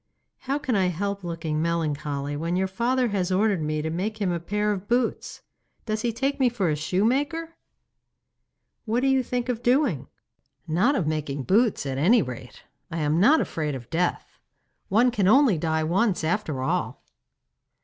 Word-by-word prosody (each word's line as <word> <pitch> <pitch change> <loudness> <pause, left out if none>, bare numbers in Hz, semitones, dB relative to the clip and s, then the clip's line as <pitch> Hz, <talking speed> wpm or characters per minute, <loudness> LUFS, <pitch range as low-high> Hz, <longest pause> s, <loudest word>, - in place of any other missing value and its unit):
'How 275 +2 -2
can 260 -5 -1
I 190 -2 +2
help 200 +3 -3
looking 165 -3 -3
melancholy 150 -3 -2
when 165 +4 -2
your 190 +1 +1
father 240 +6 0
has 190 -3 -1
ordered 195 -1 +2
me 155 0 -2
to 160 - -2
make 210 +6 -3
him 195 -4 0
a 170 - -1
pair 210 +5 -1
of 200 -1 -4
boots? 240 0 -1 0.4
Does 215 -1 -2
he 235 - 0
take 270 +5 -2
me 260 -2 +4
for 200 -9 -1
a - - +1
shoemaker?' 270 - 0 1.3
'What 230 +2 0
do 270 - +1
you 265 -1 +3
think 245 0 -3
of 240 -2 -2
doing?' 245 - +1 0.6
'Not 195 - +2
of 185 - 0
making 150 -3 -2
boots, 215 - +2
at 135 -1 -3
any 220 - +4
rate! 125 -1 -9 0.3
I 165 - -5
am 150 +2 +1
not 285 - +5
afraid 150 -3 -3
of 125 0 -10
death. 175 +2 -2 0.5
One 235 +5 +4
can 205 -5 +1
only 245 - +5
die 160 0 0
once 185 +3 +1
after 155 -6 -1
all. - - -2
190 Hz, 175 wpm, -25 LUFS, 160-240 Hz, 1.3 s, not